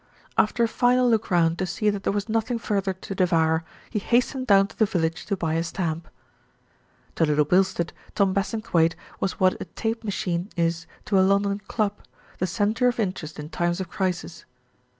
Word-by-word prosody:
After 235 +3 +2
a - - +4
final 250 +2 +3
look 225 -2 +2
round 170 -2 +2
to 185 - 0
see 210 +4 +1
that 205 -1 -4
there - - 0
was 205 +1 -2
nothing 225 +2 0
further 200 -4 -1
to 190 +1 -7
devour, 165 -3 +2 0.3
he 210 - 0
hastened 250 +4 +1
down 195 -2 +6
to - - -15
the 220 - +4
village 165 -3 -1
to 200 - -1
buy 160 -3 -1
a 165 +1 +1
stamp. 170 -2 -3 1.1
To - - +3
Little 150 -1 +3
Bilstead, 180 0 +1 0.2
Tom 195 -2 +3
Bassingthwaighte 195 -5 +1 0.2
was 190 - -2
what 185 -1 +2
a - - -3
tape 225 0 -3
machine 190 -3 -2
is 170 0 0 0.2
to 195 -2 +3
a - - +6
London 200 +1 +2
club, 210 -2 -1 0.4
the 185 - +1
centre 215 +6 +1
of 245 -1 0
in 195 -4 +1
terest 155 -4 -8
in 150 0 -7
times 175 +1 -1
of 185 -3 -4
crisis. 180 -3 -3
190 Hz, 190 wpm, -25 LUFS, 170-215 Hz, 1.1 s, down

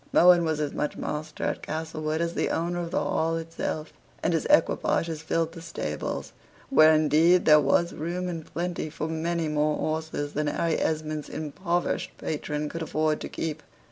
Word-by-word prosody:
Mohun 175 0 +7
was 160 -1 0
as 150 -2 -1
much 150 - -2
master 155 0 -4
at - - -1
Castlewood 155 0 -3
as 170 0 -1
the - - 0
owner 175 +1 -1
of 170 -1 -3
the - - 0
Hall 165 +1 0
itself; 165 -1 -4 0.3
and - - +2
his - - 0
equipages 165 -2 +2
filled 165 0 0
the 165 0 -10
stables, 165 0 -4 0.4
where, 155 -11 +7
indeed, 155 +3 +4
there 150 -1 +8
was 160 +5 +2
room 175 +4 -3
and 165 -3 -4
plenty 175 -2 -3
for 155 0 -4
many 165 +1 -1
more 150 0 +1
horses 155 -2 -2
than 150 +1 -1
Harry 165 +2 0
Esmond's 155 -1 -2
impoverished 170 +3 -2
patron 150 -1 -3
could 165 +3 -5
afford 155 -1 0
to - - -5
keep. 155 -1 -4
160 Hz, 175 wpm, -27 LUFS, 155-170 Hz, 0.4 s, there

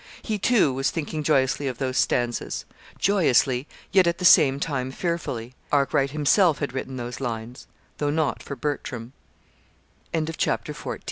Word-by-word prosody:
He, 215 -2 -2
too, 200 - +3
was 135 +1 0
thinking 155 -1 -3
joyously 140 -2 +1
of 125 -3 -3
those 130 -1 -2
stanzas 120 -2 0 0.3
joyously, 135 - +2 0.2
yet 190 -2 +5
at 170 0 +1
the 180 - -3
same 135 -5 +6
time 135 -4 -2
fearfully. 130 -7 -3 0.2
Arkwright 140 -1 +2
himself 155 +3 +3
had 140 -4 -3
written 130 0 -4
those 120 -1 -5
lines 120 +1 -5 0.3
though 145 - 0
not 155 0 0
for 140 - -6
Bertram. 130 -3 -4 1.0
CHAPTER 160 -1 -1
XV. - - -12
"MR. - - -4
140 Hz, 150 wpm, -25 LUFS, 130-160 Hz, 1.0 s, same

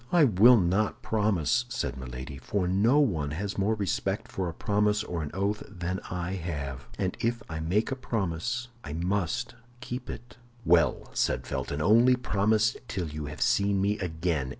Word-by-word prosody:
"I 175 -3 +6
will 120 0 +7
not 95 +3 +1
promise," 110 +1 +1
said - - -2
Milady, 65 +2 -7
"for 95 +6 -1
no 105 +9 +3
one 85 - +1
has 100 +7 -3
more 105 +3 +2
respect 100 -5 -2
for 95 -2 -2
a - - -6
promise 105 0 +1
or 85 -2 -4
an 75 - -4
oath 100 +3 -1
than 90 -1 -3
I 90 0 -3
have; 70 -6 -5
and 95 -2 -1
if 115 0 -1
I 80 -1 -5
make 95 +10 0
a - - 0
promise 120 0 -2
I 75 - -6
must 90 +1 -1 0.3
keep 125 0 -6
it." 120 +1 -8 0.3
"Well," 85 0 +3
said - - 0
Felton, 75 +1 -3
"only 115 +7 +6
promise 110 -1 +2
till 90 -5 -3
you 75 0 -5
have 75 -1 -2
seen 100 -1 +2
me 100 +2 +1
again. 80 -6 -1
95 Hz, 175 wpm, -28 LUFS, 80-110 Hz, 0.3 s, will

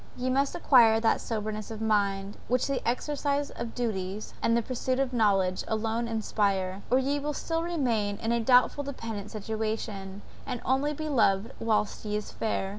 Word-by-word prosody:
ye 255 +1 -1
must 275 +1 +1
acquire 230 -4 +6
that 225 0 +2
soberness 215 -1 -3
of 220 -1 -6
mind, 200 -2 0
which 250 +1 +2
the 275 -1 -1
exercise 285 +3 -1
of 235 -1 -6
duties, 210 -4 -3
and 230 0 +3
the - - +2
pursuit 255 +1 -1
of 265 -1 0
knowledge, 195 -5 +2
alone 225 +1 -1
inspire, 200 -4 0
or 255 - +4
ye 275 +2 +1
will 295 +1 -3
still 330 0 -1
remain 245 -12 0
in 225 +2 -2
a 235 - +2
doubtful 250 +4 +4
dependent 225 -7 -5
situation, 215 -2 -4 0.2
and 250 -3 -4
only 270 +3 +2
be 310 +1 -4
loved 220 -7 +2
whilst 215 -2 0
ye 210 -1 -1
are - - -2
fair! 200 -2 -2
225 Hz, 175 wpm, -28 LUFS, 210-260 Hz, 0.2 s, acquire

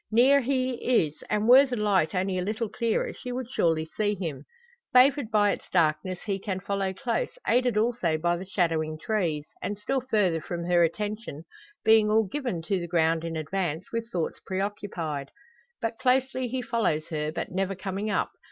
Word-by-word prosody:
Near 255 +5 +5
he 255 -4 +1
is, 150 +1 -15
and 210 +1 +1
were 265 +3 +8
the 255 - -2
light 200 -5 +1
only 185 0 0
a - - -1
little 215 +4 -2
clearer 230 +1 -1
she 250 - -7
would 250 -1 -4
surely 160 -6 +1
see 205 +5 -1
him. 170 -7 -5 0.5
Favoured 260 -1 +5
by 205 -2 +3
its - - -6
darkness 175 +2 +1
he 200 -2 -2
can 190 -1 -3
follow 195 0 -1
close, 260 - -2
aided 245 -2 +2
also 215 -8 +1
by 175 +2 +1
the 180 +2 -6
shadowing 165 -4 0
trees, 160 -6 -1
and 205 - -3
still 265 +6 -1
further 205 -10 +1
from 170 0 -4
her 175 -1 +4
attention 205 -2 -3 0.4
being 220 -1 +5
all 220 +1 +4
given 220 - -3
to 195 +2 0
the 170 - -5
ground 165 -1 +2
in 165 -1 -4
advance, 160 +1 -3
with 230 0 -3
thoughts 170 -5 -2
preoccupied. 185 -7 -3 0.5
But 225 0 -2
closely 260 0 +1
he 250 +1 -3
follows 170 -11 0
her, 155 -2 -2
but - - -4
never 195 +1 -1
coming 195 +3 -3
up. - - 0
200 Hz, 180 wpm, -27 LUFS, 170-230 Hz, 0.5 s, were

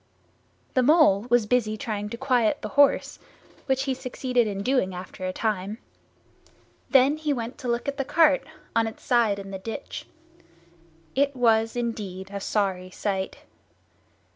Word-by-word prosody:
The 255 - +3
Mole 250 - +5
was 240 -2 +4
busy 215 -2 +1
trying 210 -1 -4
to 235 - -6
quiet 250 -4 +1
the 215 - -3
horse, 285 0 +3 0.5
which 265 -1 +1
he 270 -1 0
succeeded 250 -2 -1
in 200 -1 -3
doing 225 -7 +1
after 185 +1 -6
a - - -1
time. 205 0 -2 1.1
Then 275 +2 +5
he 310 -1 -1
went 240 -2 -4
to 255 - -6
look 235 +1 -1
at 280 0 -2
the 275 - 0
cart, 300 0 +4 0.3
on 225 -1 +3
its 220 - -9
side 230 -5 +2
in 195 0 -8
the 190 - -5
ditch. 225 +4 -7 1.1
It 280 +1 +1
was 225 -2 +3
indeed 205 -6 -4
a 200 - -3
sorry 190 -3 -1
sight. 190 0 -3
230 Hz, 155 wpm, -25 LUFS, 200-260 Hz, 1.1 s, Mole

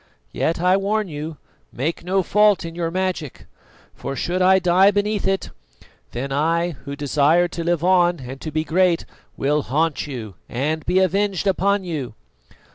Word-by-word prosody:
Yet, 165 - -1
I 180 +2 +3
warn 205 +1 -1
you, 155 +1 -6 0.3
make 155 +8 -3
no 190 +2 +1
fault 210 -1 +3
in 165 - -6
your 170 -1 -2
magic; 180 -5 -3 0.5
for 135 - -6
should 180 +6 -1
I 190 +1 +6
die 185 +1 +4
beneath 205 0 0
it, 195 0 -1 0.6
then 135 +3 -4
I, 165 +5 +1
who 140 -2 -8
desire 150 +4 +2
to 170 -1 -5
live 170 -1 0
on 175 -3 +3
and 130 +1 -8
to 155 - -4
be 155 +1 -1
great, 175 +1 +2 0.3
will 150 +2 +1
haunt 155 +3 -1
you 115 -8 -6 0.2
and 150 +5 -2
be 180 - +2
avenged 190 +1 +1
upon 200 +1 +1
you!" 145 -10 -5
170 Hz, 165 wpm, -21 LUFS, 150-190 Hz, 0.6 s, I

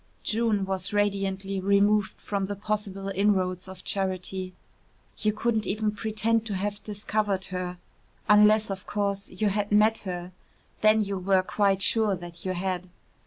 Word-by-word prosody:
June 220 -3 +1
was 190 0 -2
radiantly 195 -1 0
removed 200 +1 +2
from 200 -2 -2
the 205 - -3
possible 200 -1 -3
inroads 190 -2 +1
of 190 -1 -10
charity. 185 -1 -2 0.7
You 215 - +2
couldn't 220 -1 -1
even 215 +1 0
pretend 220 +1 0
to 205 - -2
have 205 +2 -3
discovered 205 -2 -1
her 180 0 -3 0.5
unless, 210 0 +5
of 190 -1 -6
course, 200 -1 -2
you 205 +3 0
had 205 +1 -1
met 215 +2 +4
her 180 -2 -5 0.5
then 215 0 +5
you 200 -1 -3
were 190 0 +3
quite 195 0 +1
sure 215 -2 +3
that 175 -1 -9
you 185 - -1
had. 185 0 -3
200 Hz, 150 wpm, -27 LUFS, 190-210 Hz, 0.7 s, unless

